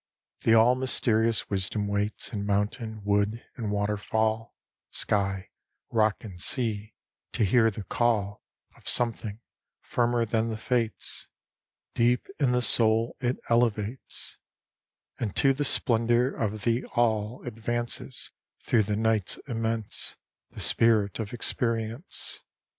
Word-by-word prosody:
The 115 - +4
all 115 +2 +6
mysterious 115 -3 +1
wisdom 100 +2 0
waits 100 +3 -1
In 100 -2 -2
mountain, 105 +2 -2
wood, 105 +3 0
and 110 -3 -3
waterfall, 105 +2 -1 0.3
Sky, 95 -2 -1 0.4
rock 110 -2 +2
and 95 -6 -8
sea, 110 -3 -1 0.4
to 110 - +2
hear 115 +3 +4
the 105 -1 -6
call 105 -1 0 0.3
Of - - -2
something 115 -2 +2 0.4
firmer 120 -1 +1
than 115 +1 0
the 110 - -3
Fates 115 -1 -2 0.7
Deep 120 +1 +2
in 135 -4 +3
the 125 0 +2
soul 115 0 +4
it 125 0 0
elevates; 115 0 -1 0.8
And 105 -4 -3
to 135 -1 +4
the 145 +2 -1
splendor 120 0 +2
of 110 -2 -3
the 120 +1 +1
All 110 -1 0
Advances, 120 0 -2 0.3
through 115 - +2
the 105 - +1
night's 110 -3 +1
immense, 115 -3 -3 0.3
The - - -8
spirit 110 -3 +3
of 105 -3 -4
experience. 115 - -2
110 Hz, 120 wpm, -27 LUFS, 105-120 Hz, 0.8 s, all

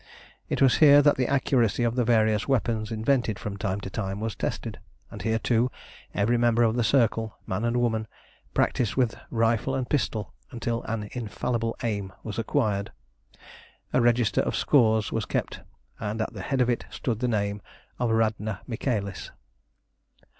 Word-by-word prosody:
It - - +1
was 130 - +5
here 145 -2 +7
that 145 0 +5
the 130 -2 +1
accuracy 125 -4 +2
of 115 -1 +1
the 125 0 +1
various 110 -2 +2
weapons 115 -5 0
invented 110 -1 +1
from 105 -1 -5
time 100 0 -2
to 95 - -6
time 95 -2 -3
was 110 0 -3
tested; - - -4 0.3
and - - -8
here, 110 0 +1
too, 120 +2 +1 0.5
every 115 +4 +2
member 120 0 +3
of 115 0 +2
the 120 - +1
Circle, 115 -3 +1
man 95 +4 -2
and 120 +1 +1
woman, 110 -2 0 0.5
practised 120 -5 +1
with 125 -4 +2 0.2
rifle 115 +3 +1
and 130 -2 -2
pistol 110 -7 -1 0.2
until 120 -1 -3
an 110 -2 -3
infallible 115 0 -2
aim 100 -4 -2
was 110 0 -5
acquired. 110 -4 0 1.0
A - - +4
register 120 -1 +3
of - - -2
scores 110 -6 +3
was - - -1
kept, - - -3 0.4
and 110 0 -3
at 110 - -2
the 100 - -7
head 130 +7 0
of 125 - +2
it 120 - -2
stood 115 -4 -3
the 125 - 0
name 100 -3 -1 0.4
of 120 -1 +1
Radna 110 -2 0
Michaelis. 110 -5 -3
115 Hz, 170 wpm, -26 LUFS, 105-120 Hz, 1.0 s, here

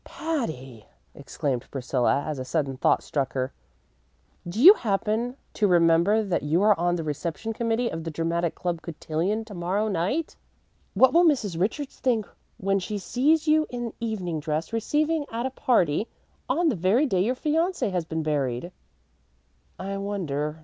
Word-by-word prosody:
"Patty," 155 - -4 0.3
exclaimed 130 -5 -4
Priscilla, 135 +1 0
as 150 -3 -4
a - - -3
sudden 135 0 -1
thought 130 - +2
struck 135 -3 -2
her, 130 0 -2 1.0
"do 190 +6 -4
you 355 - +11
happen 225 - -1 0.2
to 210 - +2
remember 175 +4 +4
that 190 -4 -1
you 160 +6 +1
are 210 -1 +6
on 175 0 +1
the 165 - -3
reception 165 +8 -4
committee 230 +1 0
of 165 -6 -4
the 165 - -4
Dramatic 165 +1 -1
Club 175 -2 -3
cotillion 170 +6 -2
to 215 - -10
morrow 190 +4 -1
night? 210 - -1 0.6
What 260 - +5
will 340 +1 +6
Mrs. 230 - +1
Richards 260 - -2
think 230 -5 +1 0.3
when 195 +1 +1
she 205 +3 -4
sees 295 +10 +1
you 310 0 +4
in 240 -2 -5
evening 190 -8 -3
dress, 155 +5 -3
receiving 300 +6 0
at 230 +2 -2
a 265 - -2
party, 215 - +1 0.4
on 345 -1 +2
the 260 - 0
very 195 - +2
day 190 -9 +1
your 245 +5 0
fiancé 320 - 0
has 180 -2 -1
been 160 0 -3
buried?" 145 0 -1 1.1
"I 195 +1 -4
wonder?" 160 -7 -3
195 Hz, 165 wpm, -26 LUFS, 160-235 Hz, 1.1 s, you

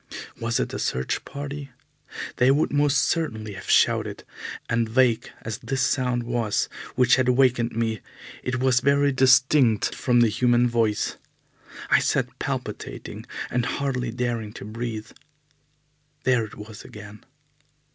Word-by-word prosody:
Was 115 0 0
it - - -2
a - - -3
search 65 +1 -1
party? 140 0 -6 0.7
They 125 - +4
would 145 +2 +2
most 145 -2 +3
certainly 110 -11 -1
have 95 - -9
shouted, - - +2 0.4
and 115 -1 0
vague 120 -1 +2
as 110 -2 -4
this 130 +2 -1
sound 125 -2 +1
was 115 -3 0 0.3
which 125 0 +5
had 130 -1 +2
wakened 125 -2 +3
me, 110 -2 -1 0.4
it 125 0 -2
was 130 -1 +3
very 140 +1 +3
distinct 130 -3 +4
from 120 -2 +2
the 120 - +6
human 120 +2 +3
voice. 115 -3 0 0.7
I - - +7
sat - - -1
palpitating - - -5 0.2
and 125 0 +1
hardly 130 -1 -2
daring 115 -3 -3
to - - -9
breathe. 110 0 -5 1.1
There 125 -3 +2
it 105 - -12
was 105 0 -10
again! 105 0 -11
120 Hz, 135 wpm, -25 LUFS, 110-130 Hz, 1.1 s, I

